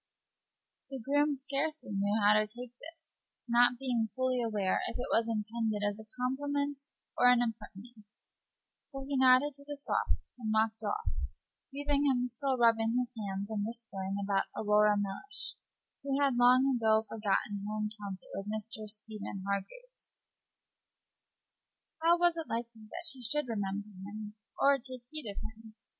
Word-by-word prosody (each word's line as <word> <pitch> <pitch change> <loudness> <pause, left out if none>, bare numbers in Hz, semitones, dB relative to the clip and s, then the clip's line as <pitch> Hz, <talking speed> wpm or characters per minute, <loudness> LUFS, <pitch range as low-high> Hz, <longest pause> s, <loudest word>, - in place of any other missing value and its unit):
The 270 - -5
groom 290 +4 +2
scarcely 280 0 -3
knew 200 +2 +1
how 205 +1 +7
to 215 0 +3
take 240 +2 -9
this, 325 +1 -12 0.3
not 240 +1 +5
being 240 -4 0
fully 255 -1 +1
aware 210 -5 +1
whether - - -4
it 245 - -2
was 230 0 +3
intended 220 -1 -1
as 205 +1 -3
a 215 0 -12
compliment 285 +2 -1 0.3
or 245 - +6
an 250 -1 +6
impertinence. 215 -1 -8 0.7
So 270 -2 -7
he 285 - -1
nodded 260 +2 +6
to 280 +1 -13
the 290 0 -6
softy 280 - -1
and 220 -2 -3 0.2
strode 220 -2 -4
off, - - -1 0.6
leaving 285 +1 +1
him 250 -2 +2
still 260 +2 -1
rubbing 230 0 +4
his 250 -1 0
hands 200 -1 -4
and 210 -2 -1
whispering 205 -4 -4
about 195 -1 +2
Aurora 210 0 +4
Mellish, 205 - -3 0.5
who 275 0 0
had 280 -3 +3
long 250 +2 +6
ago 220 -2 +3
forgotten 205 -1 -1
her 215 +1 -3
encounter 210 -3 -5
with 195 +1 -5
Mr. 215 +1 -5
Stephen 210 -2 -6
Hargraves. 200 - -6 1.8
How 335 +1 +5
was 345 -1 +3
it 325 - -4
likely 230 -2 -5
that 345 - -6
she 265 -6 -1
should 295 +4 +3
remember 205 -2 -2
him 210 +1 -7 0.3
or 280 0 +5
take 255 -1 -8
heed 310 -8 -5
of 200 - -7
him? 220 0 -8
230 Hz, 155 wpm, -32 LUFS, 210-270 Hz, 1.8 s, how